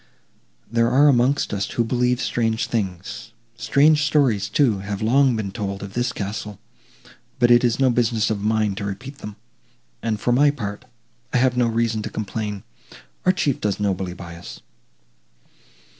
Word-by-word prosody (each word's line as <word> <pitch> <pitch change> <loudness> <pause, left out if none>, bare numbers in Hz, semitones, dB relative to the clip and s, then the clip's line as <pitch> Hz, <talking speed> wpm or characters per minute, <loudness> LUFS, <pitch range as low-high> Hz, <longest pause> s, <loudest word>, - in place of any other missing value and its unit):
There 115 +1 +1
are 140 +4 +5
amongst 135 -1 +2
us, 100 -1 -2
who 120 - 0
believe 125 +1 +1
strange 115 -1 0
things. 110 +2 -4 0.2
Strange 140 +6 +3
stories, 130 -10 +2
too, 110 -4 +2
have 100 0 -5
long 125 +4 +3
been 105 -3 -3
told 100 0 -4
of 100 -1 -8
this 120 0 0
castle, 105 0 -5 0.8
but 120 -1 +4
it 120 +1 +6
is 120 0 +1
no 130 -2 +4
business 115 -3 +1
of 105 -2 -2
mine 110 -1 +1
to 105 - -4
repeat 125 +8 -6
them; 105 -1 -8 0.7
and, 110 -2 -2
for 120 - 0
my 145 +4 +5
part, 105 -5 -5 0.5
I - - +3
have 125 0 +2
no 125 -1 +2
reason 115 -1 0
to - - -5
complain; 105 -2 -4 0.6
our - - +7
Chief 150 -8 -1
does 105 -1 -1
nobly 95 -3 -2
by 85 -1 -9
us." 85 - -10
115 Hz, 165 wpm, -22 LUFS, 100-125 Hz, 0.8 s, our